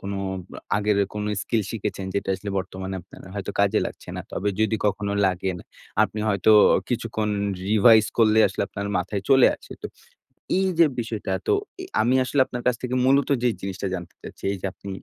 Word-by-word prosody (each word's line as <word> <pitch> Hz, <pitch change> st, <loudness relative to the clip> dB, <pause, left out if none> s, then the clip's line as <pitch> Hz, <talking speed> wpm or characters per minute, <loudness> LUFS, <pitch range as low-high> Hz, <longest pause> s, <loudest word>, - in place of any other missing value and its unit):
কোন 100 Hz, +1 st, -5 dB, 0.4 s
আ -, -, -8 dB, 0.2 s
আগের 105 Hz, 0 st, +1 dB, 0.2 s
কোনো 105 Hz, 0 st, -3 dB, 0.2 s
স্কিল 110 Hz, -2 st, 0 dB
শিখেছেন 105 Hz, -3 st, -4 dB
যেটা 100 Hz, -, -2 dB
আসলে 100 Hz, +1 st, -6 dB
বর্তমানে 95 Hz, +1 st, -5 dB
আপনার 90 Hz, -, -16 dB
হয়তো 100 Hz, 0 st, -4 dB
কাজে 100 Hz, -1 st, +3 dB
লাগছে -, -, -11 dB
না। -, -, -3 dB
তবে 105 Hz, +3 st, -1 dB
যদি 110 Hz, 0 st, +2 dB
কখনো 100 Hz, 0 st, -1 dB
লাগেন 95 Hz, -1 st, -1 dB, 0.4 s
আপনি 110 Hz, -, -2 dB
হয়তো 100 Hz, +1 st, +3 dB, 0.4 s
কিছুক্ষণ 110 Hz, -3 st, -2 dB, 0.4 s
রিভাইজ 110 Hz, +1 st, +6 dB
করলেই 110 Hz, -1 st, +5 dB
আসলে 95 Hz, -, -3 dB
আপনার 100 Hz, 0 st, -5 dB
মাথায় 95 Hz, +2 st, -2 dB
চলে 135 Hz, -2 st, +7 dB
আসে। -, -, -13 dB
তো -, -, -3 dB, 0.7 s
এই 190 Hz, -, +2 dB
যে 170 Hz, -, +8 dB
বিষয়টা 110 Hz, -4 st, -4 dB, 0.2 s
তো -, -, +4 dB, 0.3 s
এ -, -, -6 dB, 0.2 s
আমি 120 Hz, +4 st, +2 dB
আসলে 140 Hz, +2 st, -1 dB
আপনার 120 Hz, -1 st, -6 dB
কাছ 125 Hz, -, +3 dB
থেকে 125 Hz, 0 st, -2 dB
মূলত 135 Hz, +1 st, +3 dB
যে 125 Hz, -, +4 dB
জিনিসটা 95 Hz, 0 st, -4 dB
জানতে 90 Hz, -2 st, -6 dB
চাচ্ছি, -, -, -11 dB
এইযে 100 Hz, -1 st, -6 dB
আপনি 100 Hz, -, -10 dB
105 Hz, 185 wpm, -24 LUFS, 95-115 Hz, 0.7 s, যে